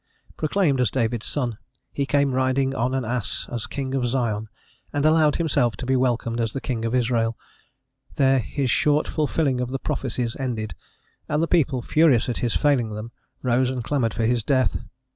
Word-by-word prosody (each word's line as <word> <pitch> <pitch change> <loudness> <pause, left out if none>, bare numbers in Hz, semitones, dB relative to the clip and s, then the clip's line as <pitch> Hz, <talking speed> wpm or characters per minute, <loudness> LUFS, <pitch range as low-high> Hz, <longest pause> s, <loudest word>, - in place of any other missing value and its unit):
Proclaimed 155 -4 +1
as 125 - +3
David's 120 -2 -1
son, 120 -7 -2 0.3
he 140 -1 -1
came 140 -1 +2
riding 130 +1 +1
on 125 +1 0
an 130 -3 -1
ass 120 -2 -2
as 120 -2 -3
king 135 -1 -4
of 135 -2 0
Zion, 115 -4 -1 0.4
and 145 +1 0
allowed 155 -1 +4
himself 140 -8 +1
to - - -5
be 130 +1 +2
welcomed 120 -2 0
as 115 -2 -1
the - - -2
king 115 -4 -3
of 115 +2 0
Israel: 115 -2 +1 0.8
there 135 -3 +4
his 130 +3 -1
short 150 0 +2
fulfilling 145 -4 0
of 125 - -2
the 135 - -2
prophecies 125 -4 -2
ended, 115 -5 -3 0.6
and 150 +2 +1
the - - +1
people, 135 -8 +2
furious 150 -6 +4
at 120 - -2
his 120 -2 0
failing 125 -7 +2
them, 110 +2 -7 0.3
rose 125 0 +2
and 130 -2 -3
clamoured 120 -5 0
for 115 - 0
his 120 0 +1
death. 130 +2 +1
130 Hz, 185 wpm, -24 LUFS, 115-140 Hz, 0.8 s, allowed